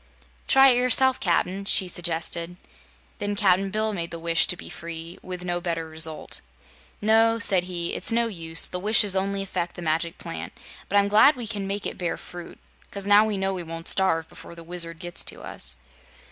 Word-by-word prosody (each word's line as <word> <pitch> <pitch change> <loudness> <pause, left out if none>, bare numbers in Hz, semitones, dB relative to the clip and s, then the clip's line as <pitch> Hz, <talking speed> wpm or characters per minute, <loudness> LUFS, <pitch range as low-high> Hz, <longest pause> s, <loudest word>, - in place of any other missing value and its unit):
"Try 270 0 +7
it 245 - +4
yourself, 255 +1 +3
Cap'n," 185 +1 0
she 190 -1 +4
suggested. 170 0 -2 0.6
Then 205 0 -2
Cap'n 195 -1 +2
Bill 215 +2 -1
made 170 -3 -3
the 170 - -6
wish 165 0 +2
to 180 - 0
be - - -9
free, 165 +1 -8
with 180 -1 -7
no 175 0 -2
better 165 -2 -3
result. 160 0 -3 0.6
"No," 225 +1 +4
said 190 -5 +2
he, 175 -2 -3
"it's - - +2
no 235 +1 +2
use; 165 -7 +2
the 180 - -1
wishes 205 0 +4
only 195 +1 -1
affect 180 -3 -4
the 175 - -8
Magic 165 +1 -1
Plant; 80 +1 -7 0.4
but 205 - +2
I'm 200 0 +4
glad 220 +9 +6
we 245 -2 -6
can 205 -3 -4
make 200 +1 -3
it - - -4
bear 175 -2 -2
fruit, 175 -1 -10 0.3
'cause 200 -1 -5
now 205 +1 +6
we 215 -2 -2
know 195 0 -1
we 185 - -4
won't 165 0 -7
starve 165 -4 +2
before 170 - -13
the 170 - -11
Wizard 170 -1 -4
gets 175 +1 -3
to - - -9
us." - - -7
180 Hz, 200 wpm, -25 LUFS, 170-205 Hz, 0.6 s, Try